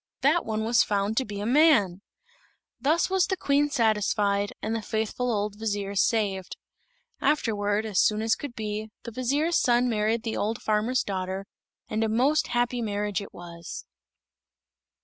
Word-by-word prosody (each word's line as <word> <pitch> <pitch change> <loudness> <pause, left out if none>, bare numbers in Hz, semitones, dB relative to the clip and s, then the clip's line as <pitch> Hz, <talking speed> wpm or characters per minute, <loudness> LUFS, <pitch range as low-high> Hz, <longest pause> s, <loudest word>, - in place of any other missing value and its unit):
That 300 +6 +2
one 220 0 -1
was 235 +2 +4
found 205 +1 0
to 265 - +2
be 205 -1 -6
a - - -3
man! 235 - +4 0.8
Thus 315 +4 +2
was 380 -1 +2
the 380 -1 -1
Queen 290 -2 +2
satisfied, 210 -5 +1
and 225 - -2
the 225 - -2
faithful 220 +3 -2
old 210 -1 -2
vizier 205 -2 -2
saved. 195 -2 0 0.6
Afterward, 210 -7 +1
as 210 -4 0
soon 215 0 +2
as 225 0 +3
could 280 -5 -5
be, 215 0 -4
the 235 - -7
vizier's 280 +8 +1
son 245 0 +3
married 220 0 0
the 225 - -3
old 215 +2 -1
farmer's 220 +4 +1
daughter; 190 0 -3 0.4
and 220 +1 -1
a 220 - 0
most 265 +8 +2
happy 240 0 0
marriage 205 -2 -2
it 200 - -9
was. 170 -1 -9
220 Hz, 160 wpm, -26 LUFS, 205-245 Hz, 0.8 s, was